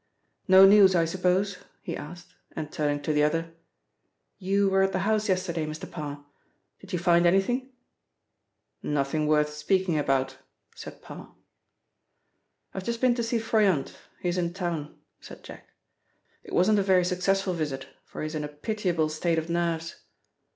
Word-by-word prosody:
"No 190 0 +8
news, 195 -1 +7
I 165 -1 +3
suppose?" 185 +3 0 0.2
he - - -4
asked, 175 +3 -10 0.2
and 155 -2 -5
turning 145 -3 -1
to 155 - -1
the 150 - +2
other: 165 +2 0 0.9
"You 200 +1 +1
were 195 0 +2
at 195 0 +1
the - - 0
house 215 -1 +1
yesterday, 175 -4 -1
Mr. 155 0 -7
Parr. 145 -1 -7 0.5
Did 195 - -14
you 180 - 0
find 175 0 +3
anything?" 245 +9 +1 1.1
"Nothing 150 +1 -1
worth 150 0 +2
speaking 170 +2 0
about," 135 -2 -1 0.3
said - - -11
Parr. - - -11 1.4
"I've 190 - -5
just 235 +3 -3
been 255 -1 +3
to 240 - -2
see 230 +1 -1
Froyant, 210 -9 +1 0.2
he 180 - -2
is 180 +1 -1
in 170 0 -2
town," 170 -5 -4 0.2
said - - -13
Jack. - - -12 0.7
"It - - -13
wasn't 205 +4 +4
a - - +3
very 190 -2 +3
successful 185 +1 0
visit, 145 -5 -4 0.2
for - - -8
he - - -2
is 155 - -5
in 155 -1 -3
a - - -3
pitiable 170 +1 -2
state 165 +2 -1
of 160 +1 -2
nerves." 170 -1 -2
175 Hz, 165 wpm, -26 LUFS, 155-195 Hz, 1.4 s, No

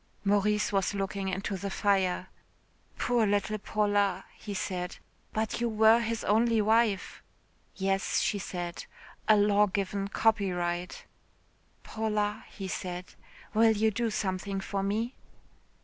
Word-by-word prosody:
'" - - -37
Maurice 205 +1 +2
was 195 0 +1
looking 195 0 -2
into 195 +1 -2
the 195 +2 -4
fire. 190 -2 +1 0.7
"Poor 240 -3 +2
little 205 +1 0
Paula," 205 -2 +1
he 210 - -8
said. 180 -2 -3 0.4
"But 220 +2 -2
you 235 - +1
were 220 +1 +5
his 230 -1 -2
only 225 +2 +3
wife." 215 -2 +2 0.5
"Yes," 195 0 0
she 205 - 0
said, 175 -3 -5 0.4
"a 215 - +6
law 205 0 +4
given 195 0 -2
copyright." 180 -5 0 0.8
"Paula," 210 -1 -2
he 195 - -7
said, 180 -1 -5 0.4
"will 225 +1 +5
you 220 +1 +3
do 230 +2 -1
something 195 -1 -2
for 195 +1 -3
me?" 220 +5 -1
205 Hz, 130 wpm, -29 LUFS, 195-220 Hz, 0.8 s, a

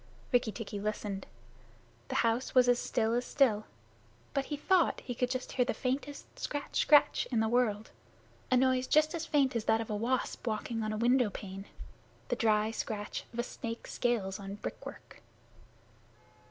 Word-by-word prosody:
Rikki 245 -3 +3
tikki 210 -2 -6
listened. 205 -2 -3 0.8
The - - -4
house 230 +4 0
was 250 -1 +6
as 245 0 +4
still 225 -1 0
as 245 +1 +1
still, 235 -7 +2 0.7
but 275 -1 0
he 295 - -4
thought 355 +3 +3
he 245 - -5
could 250 +1 0
just 255 0 -3
catch 250 -2 +1
the - - 0
faintest 275 +2 -4
scratch 290 -1 -3
scratch 295 -1 +5
in 235 - +2
the 220 - +2
world 220 -3 +1 0.6
a 255 - +4
noise 255 0 +3 0.3
as 330 -1 -3
faint 275 -4 +2
as 225 -2 -1
that 220 0 +3
of 225 -1 -4
a - - 0
wasp 245 +3 -1
walking 225 +1 -2
on 215 0 -1
a 215 - -2
window 245 0 +3
pane 195 0 -7 0.6
the - - +1
dry 215 -1 +2
scratch 210 -2 -4
of 235 - -11
a 240 - +1
snake's 230 -1 -6
scales 210 -6 0
on 200 0 -6
brick 205 - -6
work. - - -11
235 Hz, 175 wpm, -32 LUFS, 215-255 Hz, 0.8 s, was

